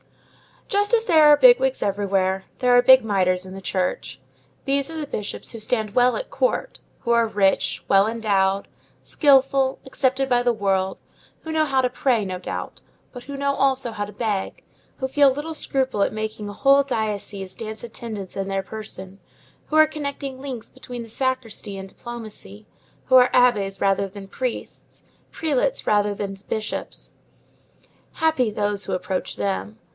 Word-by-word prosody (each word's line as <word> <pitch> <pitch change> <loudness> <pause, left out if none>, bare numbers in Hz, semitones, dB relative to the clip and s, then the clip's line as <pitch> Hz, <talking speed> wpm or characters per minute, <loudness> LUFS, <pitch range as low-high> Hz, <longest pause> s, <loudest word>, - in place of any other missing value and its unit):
Just 410 +1 0
as 455 -1 +3
there 320 -7 +5
are 295 0 +8
bigwigs - - +5
elsewhere, 195 -1 0
there 250 -1 +4
are 245 - +7
big 260 0 +7
mitres 185 -3 +1
in 185 - -9
the 195 - -8
Church. 180 -7 -2 0.5
These 275 +1 0
are 325 - -6
the 305 - -3
bishops 210 -7 -6
who 230 - -8
stand 215 -1 -2
well 250 +1 +4
at - - -5
Court, - - -1 0.2
who 235 - -1
are 235 -1 +4
rich, 200 -3 +1
well 195 +1 +5
endowed, 200 -4 +1 0.4
skilful, 270 -2 +3
accepted 265 0 0
by 245 -1 +3
the 245 0 +2
world, 195 -3 -1 0.4
who 320 - -6
know 315 -1 +2
how 270 -3 +2
to 250 - +1
pray, 245 -3 +1
no 185 -1 -4
doubt, - - -6 0.3
but 245 -2 -10
who 280 0 -6
know 280 0 0
also 265 -3 +1
how 205 -2 -3
to 205 - -11
beg, 205 -3 -3 0.3
who 265 - -2
feel 285 +1 +5
little 295 +5 -4
scruple 265 -7 -1
at - - +1
making 215 -1 -4
a - - -7
whole 275 +5 +4
diocese 210 -6 -3
dance 220 0 -7
attendance 220 -4 -7
in 195 0 -2
their 195 0 -2
person, 195 -3 -8 0.5
who 310 - -3
are 310 0 +8
connecting 280 -3 -5
links 260 -5 -7
between 245 -1 -8
the 230 - -12
sacristy 235 -5 -3
and 190 0 -8
diplomacy, 215 - -10 0.4
who 260 - +3
are 250 0 +6
abbés 205 -6 +3
rather 195 0 +2
than 195 0 -10
priests, 250 +4 -6 0.3
prelates 280 -4 -1
rather 205 -1 +2
than 195 -1 -4
bishops. 215 0 -5 1.0
Happy 315 -8 +1
those 205 -1 -2
who - - -3
approach 185 +1 -3
them! 100 +1 -3
225 Hz, 170 wpm, -23 LUFS, 195-270 Hz, 1.0 s, are